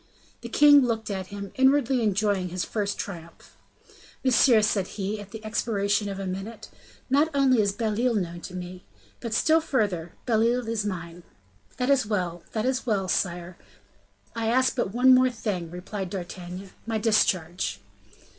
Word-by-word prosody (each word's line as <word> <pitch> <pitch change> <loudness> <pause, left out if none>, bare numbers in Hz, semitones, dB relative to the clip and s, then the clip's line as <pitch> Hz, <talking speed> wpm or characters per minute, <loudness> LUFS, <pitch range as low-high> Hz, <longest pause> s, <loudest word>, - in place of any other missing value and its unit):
The - - -7
king 290 -1 +7
looked 225 -4 -1
at 190 -2 -4
him, 200 -1 -7
inwardly 265 -1 +3
enjoying 205 -3 +1
his 180 0 -3
first 205 -2 -2
triumph. 170 -4 -8 0.7
"Monsieur," 245 -3 +5
said 200 -3 +1
he, 205 +1 -3
at 205 - -11
the 220 +1 -9
expiration 205 -2 0
of 195 - -5
a 195 - -4
minute, 195 +4 -6 0.4
"not 285 +4 +3
only 260 -4 +4
is 200 -1 +1
Belle 215 +1 -2
Isle 250 -2 +2
known 175 -4 -3
to 185 - -8
me, 180 0 -7 0.4
but, 230 - -5
still 320 +6 +4
further, 200 - -1
Belle 225 -3 +2
Isle 250 -2 -4
is 220 -2 -1
mine." 170 -2 -6 0.6
"That 250 +2 +1
is 265 -6 +3
well! 180 -5 -2
that 220 0 -1
is 260 0 0
well, 205 -6 0
sire, 175 0 -2 0.8
I 225 -1 -2
ask 255 +3 +2
but 240 -6 -1
one 255 +4 +5 0.2
thing 210 -7 -3
more," 165 - -12
replied 185 +2 -5
D'Artagnan. 180 0 -7 0.2
"My 225 -1 0
discharge." 185 - +1
205 Hz, 165 wpm, -26 LUFS, 185-235 Hz, 0.8 s, king